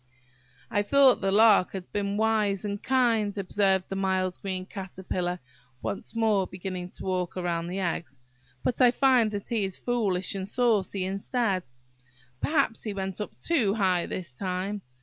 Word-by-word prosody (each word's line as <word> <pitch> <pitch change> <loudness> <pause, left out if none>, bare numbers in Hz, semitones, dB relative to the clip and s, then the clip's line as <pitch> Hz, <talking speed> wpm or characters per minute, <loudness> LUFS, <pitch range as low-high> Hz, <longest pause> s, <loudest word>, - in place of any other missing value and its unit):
"I 205 - +2
thought 270 +4 +5
the 195 -1 +1
Lark 210 -2 +5
had 190 -2 -5
been 200 0 -1
wise 215 -2 +1
and 205 0 -3
kind," 230 -6 +2
observed 195 -1 +1
the 195 - -4
mild 190 -1 0
green 185 -2 -3
Caterpillar, 185 -2 -4 0.4
once 200 - -4
more 215 -4 +2
beginning 180 -1 -6
to - - -8
walk 180 -2 -2
round 170 -2 -2
the 190 +2 -3
eggs, 170 -5 -3 0.5
"but 250 - 0
I 250 - +8
find 250 -3 +4
that 205 -1 -5
he 225 -3 0
is 190 -1 -3
foolish 200 -7 0
and 195 0 -4
saucy 210 -6 +1
instead. 195 0 -1 0.8
Perhaps 280 -7 +1
he 210 -3 -4
went 190 0 -4
up 210 - -6
too 235 -12 +1
high 185 -5 +2
this 170 -7 -5
time. 190 +4 -3
195 Hz, 160 wpm, -27 LUFS, 185-220 Hz, 0.8 s, I